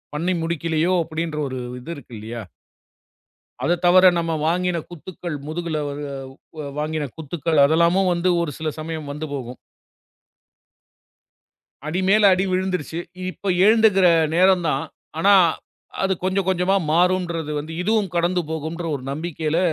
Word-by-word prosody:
பண்ணி 175 +5 0
முடிக்கவில்லையோ 165 +1 0
அப்படி 160 0 -5
என்ற 155 -2 -5
ஒரு 130 -1 -5 0.2
இது 125 +7 -8
இருக்கு 125 -3 -13
இல்லையா? 115 +2 -6 1.2
அதைத் 175 +1 +1
தவிர, 185 +1 +7
நாம 165 -1 -1
வாங்கின 175 +1 0
குத்துக்கள், 175 -1 -7
முதுகில் 160 0 -3 1.0
வாங்கின 155 -1 -2
குத்துக்கள், 160 0 -2
அதெல்லாம் 170 +5 +3
வந்து 175 +1 +1
ஒரு 170 -3 -1
சில 160 -1 -2
சமயம் 155 -2 -5
வந்து 150 +2 -5
போகும். 125 -2 -6 2.3
அடிமேல் 190 +6 +3
அடி 185 +1 +2
விழுந்துருச்சு. 185 -3 -2 0.3
இப்ப 195 +1 -4 0.2
எழுந்துக்கிற 215 -4 +5 0.3
நேரம் 185 0 +4
தான். 135 -2 0 0.3
ஆனா 200 +4 +5 0.7
அது 195 0 +2
கொஞ்சம் 190 0 0
கொஞ்சமா 185 +1 +2 0.2
மாறும்ன்றது 170 -2 +1
வந்து, 155 +2 -6
இதுவும் 210 -1 +1
கடந்து 175 +1 +1
போகும்ன்ற 160 +2 -4
ஒரு 130 - -10
நம்பிக்கையில 160 +1 -2
170 Hz, 125 wpm, -22 LUFS, 155-185 Hz, 2.3 s, தவிர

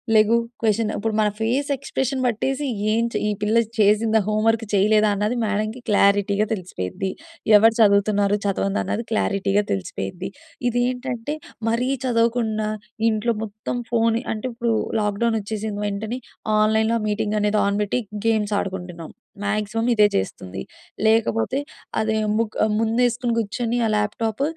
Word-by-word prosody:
లెగు 215 +2 +5 0.2
question, 220 -1 +1
ఇప్పుడు 220 +1 -2
మన 210 -1 +3
face 250 +6 0
expression 265 -1 -2
పట్టేసి, 265 +5 0 0.3
ఏం‌చే 230 +1 0
ఈ - - +1
పిల్ల 215 +2 +2 0.2
చేసిందా 215 +2 +4
హోంవర్క్ 220 +1 +1
చేయలేదన్నది 210 +2 +3
మేడమ్‌కి 215 +2 -1
క్లారిటీగా 200 0 +3
తెలిసి‌పోయిద్ది. 180 - -4 0.5
ఎవరు 225 +2 +5
చదువుతున్నారు, 205 -1 +4
చదవందన్నది 200 +3 -1
క్లారిటీగా 200 -1 +1
తెలిసి‌పోయిద్ది. 95 - -4 0.4
ఇదేంటంటే 245 +2 -2 0.3
మరీ 235 +2 0 0.2
చదవకుండా 230 -3 +1 0.4
ఇం‌టిలో 220 +1 0
మొత్తం 215 +3 -5
ఫోన్, 230 -1 +2 0.2
అంటే 215 +1 -6
ఇప్పుడు 235 -1 0 0.3
లాక్‌డౌన్ 210 +2 +1
వచ్చేసిన్న 210 0 -4
వెంటనే 215 +5 -3 0.4
ఆన్‌లైన్‌లో 220 +2 +3
ఆ - - -4
మీటింగనేది 210 0 +1
ఆన్ 200 0 0
పెట్టి 210 +5 -1 0.3
గేమ్స్ 215 -2 +1
ఆడుకుంటున్నాం. 180 -4 -6 0.3
మాక్సిమం 215 +2 -1
ఇదే 210 -2 +5
చేస్తుంది. 95 -1 -3 0.5
లేకపోతే 225 +3 +2 0.4
అదే 220 0 +1 0.2
ముక్ 225 -2 -1 0.2
ముందేసుకుని 235 +2 +1
కూర్చొని 230 +2 -1
ఆ - - +2
ల్యాప్‌టాప్ 215 +3 -1
215 Hz, 120 wpm, -22 LUFS, 205-230 Hz, 0.5 s, లెగు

